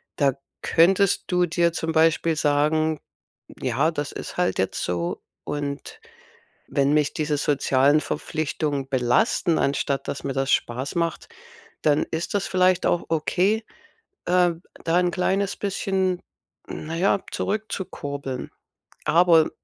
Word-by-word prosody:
Da 140 -2 +3 0.3
könntest 195 +4 +3
du 180 -1 +2
dir 170 0 +1
zum 165 -1 -2
Beispiel 165 0 +3
sagen: 155 +1 +2 0.6
„Ja, 155 +4 +1
das 145 -3 -4
ist - - -7
halt 180 - +1
jetzt 95 - -1
so, 85 -1 -2 0.2
und 145 -1 -5 0.7
wenn 140 0 +2
mich 150 -1 +2
diese 150 -1 0
sozialen 145 0 +3
Verpflichtungen 150 -3 -2
belasten, 135 - +2
anstatt 140 -1 -1
dass 140 - -4
mir 140 - -1
das 135 0 0
Spaß 125 +4 -1
macht, 170 -1 -1 0.5
dann 150 -1 +3
ist 160 +1 -3
das 200 - 0
vielleicht 185 -1 +3
auch 175 - +1
okay, 185 +7 +1 0.6
ähm, 175 -1 +2 0.2
da 165 +1 +2
'n 180 0 +2
kleines 190 +2 0
bisschen, 190 -2 -1 0.5
na 160 +1 -6
ja, 195 +2 +2
zurückzukurbeln.“ 145 -11 -4 0.6
Aber 165 0 +5
160 Hz, 125 wpm, -24 LUFS, 145-180 Hz, 0.7 s, Aber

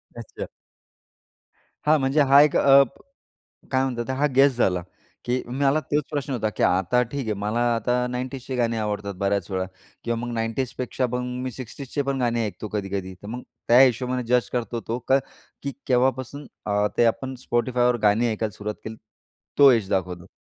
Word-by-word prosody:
अच्छा. 115 -2 -7 1.4
हां, 155 +1 +5
म्हणजे 135 +3 +2
हा 140 +1 +9
एक 150 -1 +3
अप 140 -2 +5 0.7
काय 130 -1 +2
म्हणतात 120 -3 -2
ते 130 - 0
हा 150 - +4
गेस 135 -2 +5
झाला. 90 -7 +1 0.4
की 125 +1 0
मला 135 +4 +1
तोच 150 -1 -1
प्रश्न 145 -1 -3
होता, 110 -4 0
की - - -1
आता 95 +7 +3
ठीक 140 -3 -2
आहे 110 - 0
मला 105 +4 -1
आता 125 +2 0
90ज 130 +1 -5
चे 130 - -3
गाणे 115 -2 +1
आवडतात 105 -2 -3
बऱ्याच 100 +1 0
वेळा 95 -1 -1 0.4
किंवा 115 0 -1
मग 120 +1 -4
90ज 115 +3 -2
पेक्षा 125 0 -1
मग 125 - 0 0.2
मी 130 - -2
60ज 130 +2 -8
चे 145 - +1
पण 140 -1 -2
गाणे 120 -2 +1
ऐकतो 105 +1 -6
कधी-कधी. 95 -2 -3
तर - - -9
मग 120 +4 -6 0.3
त्या 120 +2 +7
हिशोबाने 125 0 +3
जज 125 0 +2
करतो 120 -1 -2
तो, 115 +2 -1
का 135 - +5 0.4
की 140 - -3
केव्हापासून 130 +2 0 0.2
अ, 105 0 +2
ते - - +4
आपण 130 +3 0
Spotifyवर 125 0 +1
गाणी 110 +3 +3
ऐकायला 110 -2 -3
सुरुवात 105 0 -4
केली 110 0 -6 0.6
तो 140 -1 +9
एज 110 -5 +1
दाखवतो? 90 -1 -2
120 Hz, 180 wpm, -24 LUFS, 110-130 Hz, 1.4 s, हा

